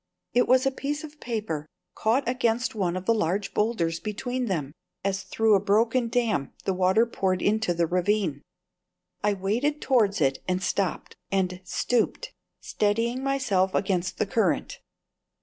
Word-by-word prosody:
It 245 Hz, 0 st, +3 dB
was 260 Hz, +1 st, +4 dB
a 270 Hz, -, +3 dB
piece 290 Hz, +3 st, -3 dB
of 305 Hz, -1 st, -10 dB
paper 210 Hz, -11 st, -3 dB, 0.3 s
caught 230 Hz, +5 st, +1 dB
against 245 Hz, -1 st, 0 dB
one 185 Hz, -5 st, -1 dB
of 185 Hz, -, -6 dB
the 230 Hz, -, +4 dB
large 200 Hz, -1 st, -1 dB
boulders 175 Hz, -7 st, 0 dB
between 245 Hz, +4 st, -3 dB
which, 150 Hz, -8 st, -2 dB, 0.3 s
as 195 Hz, 0 st, 0 dB
through 225 Hz, -1 st, +2 dB
a 200 Hz, -, +6 dB
broken 225 Hz, +5 st, +2 dB
dam, 225 Hz, -, 0 dB
the 190 Hz, -, +1 dB
water 185 Hz, +5 st, +3 dB
poured 190 Hz, -5 st, -1 dB
into 215 Hz, 0 st, +1 dB
the 170 Hz, 0 st, +1 dB
ravine. 180 Hz, -3 st, 0 dB, 0.8 s
I 210 Hz, 0 st, +3 dB
waded 235 Hz, +11 st, 0 dB
towards 220 Hz, -9 st, +2 dB
it 135 Hz, -3 st, +2 dB
and 185 Hz, +1 st, 0 dB
stooped, 190 Hz, -, -1 dB, 0.3 s
steadying 230 Hz, +5 st, 0 dB
myself 210 Hz, -9 st, +1 dB
against 185 Hz, -2 st, 0 dB
the -, -, +1 dB
current. 220 Hz, +3 st, 0 dB
210 Hz, 145 wpm, -26 LUFS, 185-240 Hz, 0.8 s, a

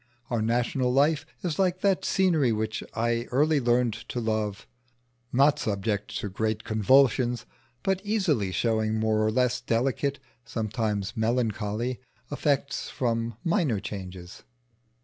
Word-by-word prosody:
Our 115 Hz, -2 st, +1 dB
national 120 Hz, +3 st, +1 dB
life 145 Hz, +4 st, +2 dB, 0.2 s
is 170 Hz, -3 st, -2 dB
like 185 Hz, -1 st, +1 dB
that 195 Hz, -2 st, +2 dB
scenery 165 Hz, -10 st, +3 dB
which 110 Hz, 0 st, -2 dB
I 115 Hz, +1 st, 0 dB
early 150 Hz, +4 st, +2 dB
learned 120 Hz, -2 st, +2 dB, 0.2 s
to 125 Hz, -, -2 dB
love, 110 Hz, -3 st, -2 dB, 0.7 s
not 140 Hz, +4 st, +4 dB
subject 105 Hz, 0 st, -2 dB
to -, -, -3 dB
great 110 Hz, +2 st, -2 dB
convulsions, 120 Hz, +2 st, +3 dB, 0.4 s
but 190 Hz, -1 st, +1 dB
easily 180 Hz, -, +1 dB
showing 110 Hz, +3 st, +1 dB
more 110 Hz, 0 st, +1 dB
or 110 Hz, -, +2 dB
less 125 Hz, +2 st, +1 dB
delicate 135 Hz, +4 st, 0 dB, 0.3 s
(sometimes 105 Hz, -3 st, -2 dB
melancholy) 115 Hz, +1 st, -1 dB, 0.3 s
effects 145 Hz, -1 st, -1 dB
from 115 Hz, -2 st, -1 dB
minor 165 Hz, -, +1 dB
changes. 95 Hz, -3 st, -8 dB
120 Hz, 125 wpm, -27 LUFS, 110-140 Hz, 0.7 s, not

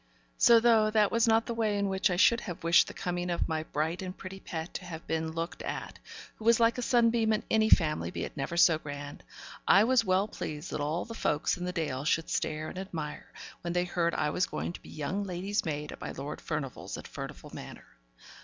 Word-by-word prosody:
So, 235 Hz, -1 st, +7 dB
though 225 Hz, -2 st, +4 dB
that 215 Hz, -2 st, +3 dB
was 230 Hz, 0 st, +3 dB
not 225 Hz, 0 st, +4 dB
the 235 Hz, -, -3 dB
way 220 Hz, -3 st, 0 dB
in 200 Hz, 0 st, +1 dB
which 190 Hz, +1 st, +1 dB
I 180 Hz, -, 0 dB
should 230 Hz, +6 st, +5 dB
have 175 Hz, -6 st, -7 dB
wished 170 Hz, +1 st, +5 dB
the -, -, -7 dB
coming 180 Hz, -1 st, -2 dB
of 175 Hz, -, 0 dB
my 160 Hz, -1 st, -1 dB
bright 160 Hz, +3 st, -2 dB
and 185 Hz, 0 st, -6 dB
pretty 190 Hz, 0 st, -8 dB
pet 165 Hz, -2 st, -6 dB
to 185 Hz, -, -6 dB
have 165 Hz, -2 st, -8 dB
been 160 Hz, 0 st, -2 dB
looked 165 Hz, +1 st, -4 dB
at -, -, -5 dB, 0.4 s
who 220 Hz, -, -10 dB
was 230 Hz, 0 st, +5 dB
like 230 Hz, +1 st, +3 dB
a -, -, -1 dB
sunbeam 230 Hz, -2 st, +3 dB
in 215 Hz, -, +1 dB
any 220 Hz, 0 st, +4 dB
family, 155 Hz, -4 st, +3 dB
be -, -, -4 dB
it -, -, -6 dB
never 140 Hz, +5 st, -3 dB
so 165 Hz, -2 st, +6 dB
grand 145 Hz, -1 st, -7 dB, 0.4 s
I 200 Hz, -, +7 dB
was 255 Hz, +2 st, +4 dB
well 190 Hz, +2 st, +2 dB
pleased 150 Hz, -5 st, -6 dB
that -, -, -2 dB
all 155 Hz, +4 st, -1 dB
the 230 Hz, -, -8 dB
folks 150 Hz, -9 st, 0 dB
in 180 Hz, -, -5 dB
the 180 Hz, -, -2 dB
Dale 150 Hz, -6 st, -2 dB
should 165 Hz, +2 st, 0 dB
stare 155 Hz, 0 st, -1 dB
and 185 Hz, -, -6 dB
admire, 165 Hz, -6 st, -6 dB, 0.3 s
when 170 Hz, 0 st, -3 dB
they 175 Hz, 0 st, +1 dB
heard 170 Hz, -1 st, 0 dB
I 150 Hz, -, 0 dB
was 180 Hz, -, +1 dB
going -, -, -4 dB
to -, -, -10 dB
be -, -, -14 dB
young 180 Hz, +7 st, -3 dB
lady's 195 Hz, +2 st, -2 dB
maid 150 Hz, -1 st, -3 dB
at -, -, -10 dB
my -, -, -4 dB
Lord 140 Hz, +2 st, -6 dB
Furnivall's 150 Hz, -5 st, -4 dB
at -, -, -9 dB
Furnivall -, -, -8 dB
Manor. -, -, -9 dB
180 Hz, 235 wpm, -30 LUFS, 160-215 Hz, 0.4 s, So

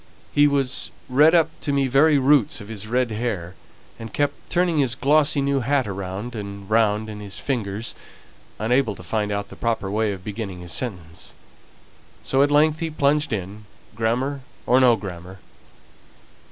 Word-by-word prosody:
He 145 Hz, 0 st, +5 dB
was 140 Hz, -2 st, 0 dB, 0.2 s
red 150 Hz, +6 st, +5 dB
up 165 Hz, -1 st, +3 dB
to 145 Hz, -, -2 dB
the 140 Hz, -1 st, +2 dB
very 145 Hz, +4 st, +4 dB
roots 135 Hz, -3 st, +3 dB
of 100 Hz, -, -10 dB
his 110 Hz, -1 st, -6 dB
red 125 Hz, +1 st, 0 dB
hair, 105 Hz, -6 st, -3 dB, 0.5 s
and 115 Hz, -1 st, -8 dB
kept 145 Hz, -1 st, -2 dB
turning 175 Hz, -3 st, +2 dB
his 130 Hz, -5 st, +2 dB
glossy 145 Hz, +1 st, +3 dB
new 140 Hz, 0 st, +1 dB
hat 135 Hz, +1 st, +1 dB
round 100 Hz, +4 st, -5 dB
and 100 Hz, -2 st, -7 dB
round 110 Hz, 0 st, +2 dB
in 105 Hz, -1 st, -7 dB
his 100 Hz, -1 st, -5 dB
fingers, 110 Hz, -5 st, -3 dB, 0.6 s
unable 115 Hz, 0 st, +1 dB
to 90 Hz, -, -12 dB
find 105 Hz, +3 st, -2 dB
out 100 Hz, 0 st, -3 dB
the -, -, -11 dB
proper 115 Hz, -4 st, -2 dB
way 110 Hz, 0 st, +1 dB
of 95 Hz, -2 st, -7 dB
beginning 100 Hz, -3 st, -6 dB
his 90 Hz, -1 st, -5 dB
sentence, 90 Hz, -10 st, -4 dB, 0.9 s
so 135 Hz, -, +2 dB
at 145 Hz, -, +4 dB
length 155 Hz, +2 st, +3 dB
he 165 Hz, -1 st, -2 dB
plunged 150 Hz, 0 st, +1 dB
in, 105 Hz, +1 st, -5 dB, 0.3 s
grammar 125 Hz, +6 st, -1 dB, 0.2 s
or 125 Hz, +2 st, +4 dB
no 125 Hz, -3 st, +6 dB
grammar. 95 Hz, -3 st, -8 dB
115 Hz, 165 wpm, -23 LUFS, 100-140 Hz, 0.9 s, no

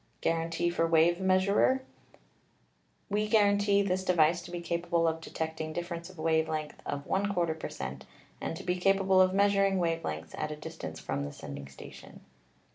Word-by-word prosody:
Guarantee 165 Hz, +1 st, 0 dB
for 165 Hz, -1 st, +1 dB
wave 165 Hz, +2 st, +4 dB
measurer: 190 Hz, +7 st, +3 dB, 1.2 s
"We 210 Hz, +1 st, 0 dB
guarantee 205 Hz, -1 st, +4 dB
this 185 Hz, -1 st, 0 dB
device 170 Hz, -2 st, +3 dB
to 175 Hz, -, -11 dB
be 175 Hz, 0 st, -4 dB
capable 170 Hz, 0 st, 0 dB
of 160 Hz, 0 st, -1 dB
detecting 160 Hz, -1 st, -4 dB
difference 170 Hz, +1 st, -5 dB
of 185 Hz, -, -15 dB
wave 160 Hz, 0 st, +1 dB
length 155 Hz, -1 st, -4 dB
of 140 Hz, 0 st, -3 dB
34 190 Hz, -4 st, 0 dB
P 160 Hz, -, -6 dB
er -, -, -10 dB
cent., 70 Hz, 0 st, -6 dB, 0.4 s
and 165 Hz, -, -3 dB
to -, -, -8 dB
be 180 Hz, 0 st, 0 dB
capable 195 Hz, 0 st, +4 dB
of 185 Hz, 0 st, +4 dB
measuring* 195 Hz, 0 st, +3 dB
wave 165 Hz, -2 st, 0 dB
lengths 80 Hz, +1 st, -5 dB
at 155 Hz, -, -2 dB
a 150 Hz, -, -4 dB
distance 150 Hz, -, -7 dB
from 70 Hz, -, -3 dB
the 70 Hz, -, -5 dB
sending 70 Hz, -1 st, -8 dB
station." 70 Hz, -, -12 dB
170 Hz, 175 wpm, -30 LUFS, 160-190 Hz, 1.2 s, wave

